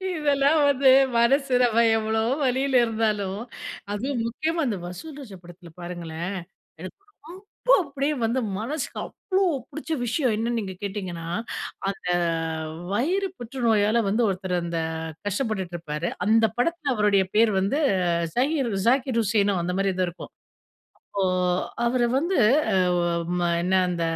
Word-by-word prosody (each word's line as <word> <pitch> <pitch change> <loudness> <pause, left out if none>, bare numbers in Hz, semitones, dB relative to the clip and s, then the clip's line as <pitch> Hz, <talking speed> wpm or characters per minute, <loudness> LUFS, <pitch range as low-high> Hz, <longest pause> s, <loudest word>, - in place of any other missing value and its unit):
இதெல்லாம் 290 -1 +2
வந்து 275 -1 +4 0.3
மனசு 270 +3 +3
நம்ம 235 -1 +4
எவ்வளோ 220 0 0 0.2
வலில 260 0 +2
இருந்தாலும், 210 -3 -1 0.5
அதுவும் 240 +2 -2
முக்கியமா 320 +7 -1
அந்த 210 - -1
வசூல் 275 - -8
ராஜா 205 -8 -10
படத்துல 175 0 -13
பாருங்களேன், 175 +1 -5 0.5
எனக்கு 185 - -9 0.7
ரொம்ப - - +4
அப்டியே 280 0 -2
வந்து 235 +3 0 0.2
மனசுக்கு 270 +7 -4
அவ்ளோ 385 -1 -2 0.3
புடிச்ச 315 +1 -7
விஷயம் 245 0 +1
என்னன்னு 235 +1 -1
நீங்க 190 -2 -6
கேட்டிங்கன்னா, 185 -5 -5 0.6
அந்த 195 -2 -6 0.9
வயிறு 370 - 0
புற்றுநோயால 230 -3 +1
வந்து 225 +4 +2
ஒருத்தர் 185 -1 -2
அந்த 170 -1 -2 0.5
கஷ்டப்பட்டுட்டு 205 -4 -2
இருப்பாரு. 155 0 -4 0.2
அந்த 225 +1 +5
படத்துல 295 +1 0
அவருடைய 205 -3 +3
பேர் 225 -1 +5
வந்து, 200 +11 0 0.6
ஜாகீர் 270 -1 +1 0.2
ஜாகீர் 255 -2 +2
உசேனோ 205 -1 +2
அந்த 180 +1 -2
மாதிரி 195 -1 +1
ஏதோ 185 - +2
இருக்கும். 175 - -11 0.8
அப்போ 200 - -1 0.6
அவர 245 +1 +1 0.2
வந்து 345 +5 0 0.4
அ - - +2 0.2
ஒ - - +2 0.4
ம 175 - +1 0.2
என்ன 185 +2 +1
அந்த 175 -2 -2
225 Hz, 130 wpm, -25 LUFS, 190-270 Hz, 0.9 s, அந்த